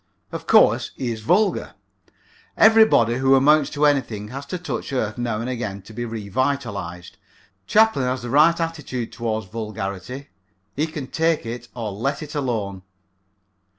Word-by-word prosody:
Of - - -7
course, - - +5
he 125 -3 -3
is 110 -1 -5
vulgar. 190 - +1 0.8
Everybody 220 - +5
who 135 +1 +4
amounts 145 +2 +4
to 150 0 +1
anything 115 -8 0
has 135 +3 -7
to 180 - -3
touch 180 -4 -5
earth 110 -4 -2
now 115 -3 -1
and 115 - -4
again 105 -6 -4
to 110 - -13
be 120 +2 -4
revitalized. 100 -5 -3 0.5
Chaplin 220 - +4
has 125 -1 -2
the 120 - -5
right 155 +5 +5
attitude 150 -8 -4
toward 110 -2 -3
vulgarity. 110 +3 -5 0.5
He 150 +3 0
can 155 -4 -6
take 160 +2 0
it 120 +1 -6
or 115 -4 -4
let 140 +9 -2
it 150 - -9
alone. 110 -9 -2
125 Hz, 150 wpm, -22 LUFS, 110-145 Hz, 0.8 s, course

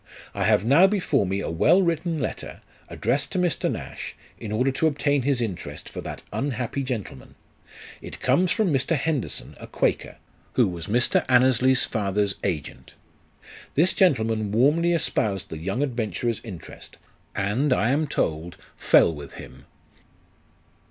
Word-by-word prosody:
I - - -1
have 100 - +3
now 155 +10 +6
before 180 - +1
me 95 +2 -1
a - - -3
well 155 - +4
written 170 -1 -1
letter, 140 - -5 0.3
addressed 140 +2 -1
to - - -1
Mr. 180 -2 0
Nash, - - -7 0.2
in 110 - -6
order 125 +5 +1
to 160 +4 +1
obtain 145 -2 +1
his 130 -1 0
interest 105 -7 -5
for - - -7
that - - -7
unhappy 130 -1 -2
gentleman: 115 - -6 0.7
it - - -9
comes 165 +8 +2
from 210 -8 +1
Mr. 135 +4 +1
Henderson, 150 -3 -3
a - - -9
quaker, - - -1 0.4
who - - +3
was 85 -1 -6
Mr. 120 +3 +2
Annesley's 130 0 +4
father's 100 -2 -1
agent. 70 -5 -4 0.8
This 170 +6 +3
gentleman 110 - +2
warmly 150 +10 +3
espoused 110 - -1
the 80 - -5
young 95 - -1
adventurer's 120 -3 -2
interest, 95 -9 -10 0.4
and, 110 +9 0
I 115 -2 +2
am 150 +3 +1
told, 80 - -2 0.2
fell 85 - +4
with 75 -2 -9
him. - - -12
125 Hz, 145 wpm, -24 LUFS, 100-145 Hz, 0.8 s, now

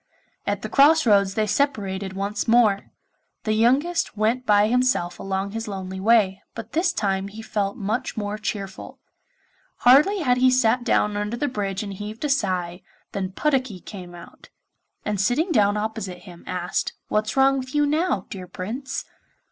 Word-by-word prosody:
At - - -1
the - - -2
cross 305 +2 +5
roads 200 -3 +3
they 215 - +1
separated 205 -6 -1
once 200 +2 -3
more. 225 -4 +3 0.5
The 215 - 0
youngest 265 +7 +2
went 230 +4 0
by 205 0 +5
himself 250 -7 +1
along 195 +1 -3
his 225 +1 -5
lonely 190 -2 -5
way, 200 -2 +3
but 230 -1 -8
this 345 +3 +2
time 195 - -1
he 215 +3 -9
felt 205 -2 -2
much 215 +4 -3
more 210 0 -3
cheerful. 200 -3 -5 0.9
Hardly 300 +11 +6
had 250 -5 +2
he 255 +1 +5
sat 250 -1 +3
down 210 -3 +1
under 210 +3 -2
the 290 - 0
bridge 200 -5 -3
and 200 -1 -6
heaved 210 +7 -6
a - - 0
sigh, 185 -8 -1 0.3
than 190 -1 -4
Puddocky 260 -7 0
came 180 -2 -10
out; 170 - -14 0.6
and, 210 -2 -1
sitting 290 - +1
down 205 -6 +3
opposite 210 -4 -4
him, 175 -3 -13
asked, 180 -1 -2 0.2
'What's 215 +4 -1
wrong 270 0 +4
with 260 +2 -7
you 295 0 +4
now, 305 - 0
dear 185 -2 -7
Prince? 240 +10 -5
215 Hz, 165 wpm, -23 LUFS, 195-255 Hz, 0.9 s, Hardly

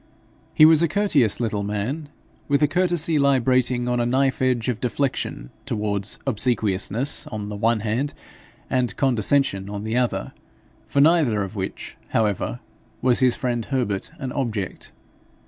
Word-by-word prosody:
He 155 - +8
was 160 0 +6
a 170 - +4
courteous 155 - +2
little 110 -4 -1
man, 105 +10 -3 0.4
with 140 0 +2
a - - +5
courtesy 170 -1 +1
librating 130 -2 +2
on 125 0 0
a 120 - +1
knife 130 +2 +1
edge 125 -3 +1
of 120 -3 -1
deflection 125 - -2
towards 105 -1 -3
obsequiousness 115 0 0
on 105 -2 -5
the 105 - -5
one 115 +1 +1
hand 115 +7 -2 0.5
and 125 -2 -1
condescension 120 -5 +1
on 105 0 -5
the 110 +2 -1
other, 125 -1 -1 0.5
for 140 - +2
neither 145 -10 +3
of 100 +2 -7
which, 95 -2 -5
however, 100 - -1 0.4
was 125 -2 +3
his 125 -2 +3
friend 120 -3 -2
Herbert 120 -8 -2
an 130 -2 -5
object. 110 -8 -3
125 Hz, 145 wpm, -23 LUFS, 105-140 Hz, 0.5 s, He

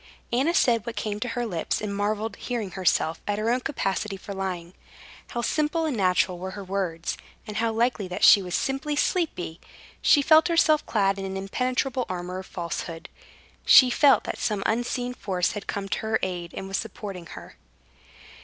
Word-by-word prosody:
Anna 280 +8 +2
said 230 -4 +3
what 235 - -4
came 210 -1 -3
to 245 - -2
her 240 0 -2
lips, 175 -7 -2
and 205 -1 -4
marveled, 210 +1 -1
hearing 230 -6 -4
herself, 170 -3 +1
at 205 0 0
her 220 +2 0
own 250 - +2
capacity 215 -6 -2
for 200 +1 -8
lying. 185 -3 -4 0.5
How 240 -1 -4
simple 310 +4 0
and 300 -5 -1
natural 185 -2 +2
were 190 +2 -6
her 200 - -6
words, 185 -4 -3 0.3
and 210 - -6
how 230 0 +1
likely 225 -3 0
that 180 - -5
she 205 - +9
was 180 -2 -3
simply 270 +2 -1
sleepy! 290 - -1 0.4
She 285 - +5
felt 315 +3 +6
herself 320 -3 +3
clad 195 -2 +1
in 195 - -4
an 190 0 -4
impenetrable 250 +5 -1
armor 180 0 -4
of 190 - -9
falsehood. 170 -1 -5 0.5
She 255 -2 +8
felt 275 +2 +5
that - - -5
some 210 -3 -1
unseen 245 +2 -1
force 185 -7 -1
had 205 - -7
come 200 -1 -3
to - - -1
her 220 0 0
aid 175 -2 -3
and 190 - -5
was 195 0 -2
supporting 195 -5 -6
her. - - -12
205 Hz, 185 wpm, -26 LUFS, 190-245 Hz, 0.5 s, she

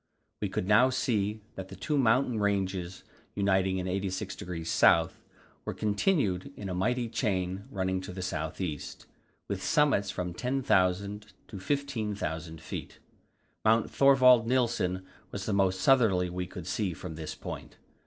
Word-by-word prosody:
We - - -1
could 90 - -2
now 105 +5 +6
see 110 -5 0
that 95 -1 -7
the - - -10
two 150 - -2
mountain 125 -2 +3
ranges 95 -3 -1 0.3
uniting 95 -2 +2
in 90 - -2
86° 90 -3 -3 0.2
S. - - -13 0.5
were - - -4
continued 105 - 0
in 100 - -5
a - - -2
mighty 120 +7 0
chain 95 -4 -1
running 95 -1 -1
to 95 - -7
the 95 0 -5
south 80 -4 -3
east, 80 -6 -5 0.4
with 100 -2 -3
summits 150 -10 +2
from 90 -2 -3
10,000 105 -4 0 0.2
to 100 - -7
15,000 105 - -3
feet. - - -7 0.7
Mount 110 +1 +3
Thorvald 130 -4 +6
Nilsen 115 -7 0 0.2
was 95 -1 -5
the 110 - -1
most 95 -1 +2
southerly 100 -9 +3
we 90 0 -3
could 90 -1 -8
see 100 -5 -1
from 90 0 -7
this 80 -1 -6
point. - - -8
100 Hz, 145 wpm, -29 LUFS, 90-115 Hz, 0.7 s, now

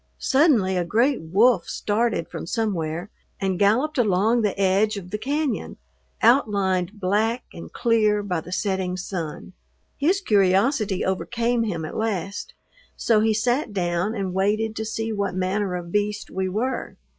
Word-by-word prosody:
Suddenly 255 - +3
a 180 - +1
great 235 +10 +1
wolf 195 +4 +3
started 215 -4 0
from - - -7
somewhere 175 -3 -2 0.3
and 190 -2 -1
galloped 250 +9 +2
along 220 +2 +3
the 205 -2 -1
edge 200 +3 +2
of 180 -2 -8
the 210 - -3
cañon, 285 +1 -2 0.5
outlined 200 -5 +2
black 215 +5 0
and 170 - -10
clear 215 -3 +2
by 180 -5 -2
the 180 - -11
setting 185 -1 -1
sun. 180 -2 -5 0.4
His 350 +7 +2
curiosity 200 - +2
overcame 235 +5 0
him 170 -7 -3
at - - -7
last, 200 -3 -3 0.4
so 225 -2 +3
he 220 0 +2
sat 245 +2 0
down 180 +3 -1
and 195 -3 -3
waited 215 +3 0
to 220 - -2
see 225 0 -3
what 200 -3 -2
manner 185 +1 -1
of 175 -1 -6
beast 210 +1 -1
we 190 0 -2
were. 235 +7 -3
205 Hz, 150 wpm, -23 LUFS, 185-225 Hz, 0.5 s, Suddenly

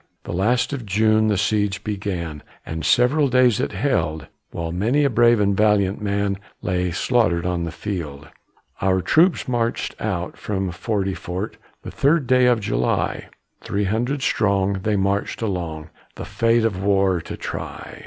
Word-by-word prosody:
The - - -6
last 115 +9 +1
of 135 -4 -4
June 110 +1 +2
the 105 -2 +1
siege 105 -1 0
began, 95 -7 -4 0.2
And 80 0 -5
several 140 +4 +3
days 125 -3 +3
it 130 - -1
held, 80 - -1 0.2
While 85 -1 -4
many 115 - +1
a 140 - +2
brave 120 0 +4
and 100 -1 +2
valiant 105 -2 +2
man 100 -1 -1 0.2
Lay 90 0 0
slaughtered 90 -2 +1
on 90 -1 -1
the 80 - -4
field. 80 -7 -5 0.5
Our 95 -1 +2
troops 170 -1 +3
marched 120 -2 -1
out 90 -5 -3
from 95 -3 -3
Forty 95 +2 -2
Fort 95 +4 -5 0.3
The - - -7
third 145 +1 +2
day 125 0 +4
of 120 -2 +3
July, 60 - -1 0.3
Three 100 +1 -2
hundred 120 +8 -1
strong, 100 -4 +1
they 105 +2 0
marched 100 +1 -1
along, 85 -6 -4 0.2
The - - -7
fate 115 0 +2
of 95 -4 -1
war 95 -3 +2
to - - -7
try. - - -7
100 Hz, 160 wpm, -22 LUFS, 90-115 Hz, 0.5 s, brave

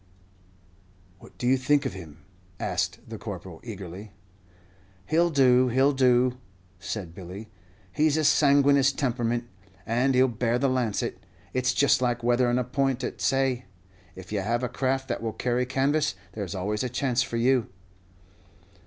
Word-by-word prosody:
"What - - -17
do - - -4
you 130 +2 +4
think 145 +2 +2
of - - -2
him?" 85 -4 -11 0.4
asked - - -1
the - - -8
Corporal, 90 -4 -8
eagerly. 100 -2 -8 0.9
"He 155 - +1
'll 175 0 +4
do 130 -4 +4
he 125 +1 0
'll 140 +2 +5
do," 125 -2 +2 0.4
said 95 -3 -5
Billy. 95 +5 -9 0.4
"He's 155 0 +2
a 155 - +1
sanguineous 140 -2 +4
temperament, 120 -3 -1 0.4
and 125 +4 +1
he'll 130 +1 +5
bear 120 0 0
the 135 +2 +1
lancet. 125 -5 -1 0.3
It's 130 0 +1
just 140 -2 +3
like 120 -1 0
weatherin' 120 0 +2
a 125 - +1
point 130 0 -1
at - - -5
say. 135 -3 +1 0.5
If 95 +1 -11
you 105 - 0
have 120 +5 -1
a 125 - -1
craft 135 +2 -1
that - - -2
will 115 -1 -3
carry 125 0 -1
canvas, 135 -3 +1 0.2
there's 100 -4 -5
always 105 +4 -2
a 125 - -2
chance 125 +1 0
for 120 -1 -2
you." 125 0 +2
125 Hz, 160 wpm, -26 LUFS, 115-135 Hz, 0.9 s, ll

